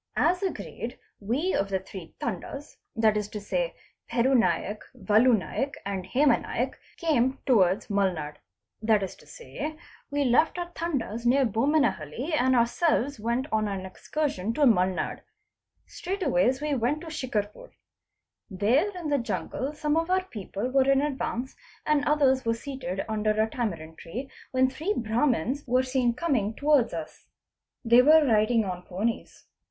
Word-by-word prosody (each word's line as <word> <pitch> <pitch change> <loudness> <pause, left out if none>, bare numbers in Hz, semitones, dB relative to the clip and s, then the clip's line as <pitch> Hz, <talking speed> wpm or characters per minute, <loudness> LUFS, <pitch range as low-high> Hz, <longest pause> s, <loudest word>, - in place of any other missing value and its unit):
As 360 +2 +2
agreed 385 - -4 0.2
we 265 - -1
of 195 - 0
the 195 - +1
three 190 -3 -10
Tandas 240 - -5 0.2
that 220 -1 +3
is 210 -1 -1
to 210 0 -6
say - - -1
of - - -9 0.4
Peru 240 +3 +2
Naik, 205 -2 +1 0.2
Valu 220 +3 +4
Naik 275 +8 -3
and 195 -2 -3
Hema 275 +9 +3
Naik, - - -2 0.2
came 265 -6 +1
to 255 -4 +4
wards 185 0 +2
Mulnad. 180 -8 -1 0.4
'That 215 -2 +3
is 190 - -5
to - - -19
say, 310 -10 -7 0.3
we 285 0 0
left 260 +8 +3
our 350 0 -4
T'andas 255 -9 -3
near 265 +2 +4
Bommenhalli 230 - 0
and 260 -3 +3
ourselves 250 +2 +1
went 235 +4 -1
on 215 -1 +1
an 195 -2 -4
excursion 225 +1 -3
to - - -2
Mulnad. 185 -6 +2 0.7
Straightways 275 -8 0
we 300 -1 0
went 265 +4 0
to 340 - -9
Shicarpur. 245 - -3 0.8
There 225 - +2
in 335 -4 -4
the 285 -1 +2
jungle 260 +3 -3
some 300 0 0
of 330 +1 0
our 370 0 +2
people 210 - -5
were 270 0 +3
in 275 0 +4
advance 265 -3 -2
f - - -28 0.3
and 300 -2 +2
others 275 -3 +3
were 230 0 +1
seated 255 -7 -5
under 215 -1 0
a 220 - +3
tamarind 170 -10 -4
tree, 250 +11 -7 0.2
when 260 0 +3
three 315 +11 -2
Brahmans 240 - 0
_ - - -33
were 255 +2 +3
seen 255 -2 +1
coming 240 -10 0
towards 285 -4 +3
us. 160 -2 -7 0.6
They 235 +2 +7
were 310 +3 +6
riding 220 -1 +3
on 180 -2 -4
ponies. 195 +6 -4
245 Hz, 160 wpm, -27 LUFS, 210-290 Hz, 0.8 s, They